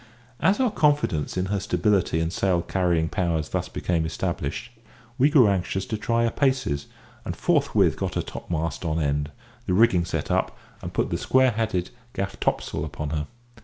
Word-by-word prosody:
As 195 +5 +3
our 255 -4 +2
confidence 145 - +1
in 90 - +1
her 100 +1 -1
stability 100 -4 +1
and 80 +1 -1
sail 90 -3 +1
carrying 85 -3 +1
powers 85 -5 -1
thus - - -2
became 85 -2 -1
established, 80 - -3 0.5
we 140 +4 +5
grew 140 -7 +6
anxious 95 0 0
to 110 - -3
try 115 +2 0
her 115 - +2
paces, 130 - 0 0.4
and - - -4
forthwith - - +2
got - - -3
her - - 0
topmast 85 0 -4
on 80 -1 -1
end, 75 -1 0 0.4
the 90 - +2
rigging 95 -5 +4
set - - -3
up, - - 0 0.2
and - - -6
put - - -1
the - - -1
square 130 -1 +4
headed 105 -5 -1 0.2
gaff 95 0 -4
topsail 75 - -1
upon 75 -1 -5
her. 75 -1 -2
90 Hz, 175 wpm, -25 LUFS, 80-115 Hz, 0.5 s, grew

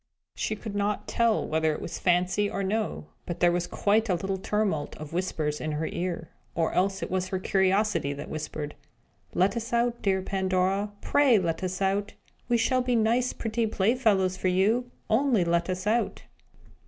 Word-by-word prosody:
She 215 - -2
could 215 -1 -7
not 205 0 -1
tell 230 -2 +2
whether 160 0 +1
it - - -6
was 165 - -6
fancy 180 +3 +2
or 200 - -2
no; 195 - -1 0.2
but 175 0 -4
there 175 0 +5
was 175 0 -1
quite 215 +2 +1
a 180 - +3
little 190 +2 -2
tumult 195 -7 -1
of 155 +1 -8
whispers 155 -4 -1
in 155 -1 -2
her 155 +2 -1
ear 175 -1 -3 0.2
or 165 -1 0
else 195 +2 +1
it - - -5
was 185 0 0
her 190 - -2
curiosity 190 -3 +1
that 145 +2 -7
whispered: 155 -1 -5 0.6
"Let 190 +5 +3
us 235 +1 -4
out, 235 0 +1
dear 190 -2 +1
Pandora 190 +1 0
pray 280 -5 +4
let 170 -2 -1
us 185 +1 -2
out! 200 +1 0 0.4
We 240 - +3 0.2
will 255 0 +3
be 250 -1 +1
such - - +4
nice 235 +3 +2
pretty 225 0 -1
playfellows 205 -3 +2
for 190 - -1
you! 210 +7 +2 0.2
Only 225 -4 +3
let 170 +1 +1
us 185 +1 -3
out!" 230 +3 0
190 Hz, 185 wpm, -27 LUFS, 175-220 Hz, 0.6 s, there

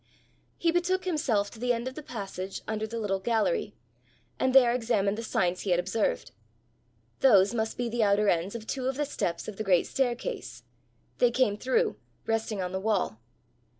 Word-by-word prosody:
He 335 - +2
betook 360 +2 0
himself 235 - 0
to 220 - -12
the 245 +1 +1
end 235 +1 -3
of 260 - -4
the 310 - -7
passage 195 -7 -6
under 220 0 -2
the 230 +1 -5
little 200 -3 -1
gallery, 235 - 0 0.6
and 260 - +2
there 250 -2 +6
examined 220 -5 +1
the 225 - -4
signs 180 -4 0
he 200 - -4
had 175 -1 +3
observed: 190 - -1 0.9
those 205 -5 +5
must 220 -1 -2
be 245 - -1
the 235 0 -1
outer 205 0 +3
ends 180 +3 +1
of 225 -2 -6
two 260 +2 -3
of 265 - -1
the 295 +2 0
steps 175 -11 -3
of 215 -3 -7
the 215 - -2
great 185 -4 +3
staircase! 265 - -3 0.6
they 245 - +5
came 240 -4 +2
through, 340 - 0 0.3
resting 225 -3 -1
on 180 - -3
the 190 - -2
wall. 195 - 0
225 Hz, 185 wpm, -28 LUFS, 200-255 Hz, 0.9 s, there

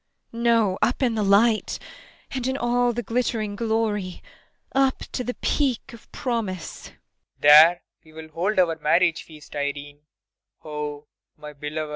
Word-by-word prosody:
] - - -50
No, 230 - -7
no 230 -5 +3
up 250 +3 +1
in 240 -3 +2
the 220 - -1
light, 210 +3 +3 0.5
and 260 -2 -3
in 265 +1 -1
all 245 -1 +1
the 240 +1 -4
glittering 225 -2 -2
glory! 215 -4 -2 0.5
Up 270 0 +2
to 250 - -3
the 250 +1 -4
Peak 265 -5 -1
of 230 - -15
Promise! 215 -9 -4
PROFESSOR - - -20 0.3
RUBEK. - - -38
There 155 +4 +8 0.2
we 155 -1 -19
will 160 0 -10
hold 180 +7 -2
our 165 -3 +2
marriage 165 +2 +2
feast, 155 -2 -14
Irene 145 0 -4 0.7
oh, 150 -1 -5 0.3
my 150 -1 -10
beloved! 150 +2 -4
IRENE. 155 - -8
200 Hz, 165 wpm, -24 LUFS, 155-235 Hz, 0.7 s, There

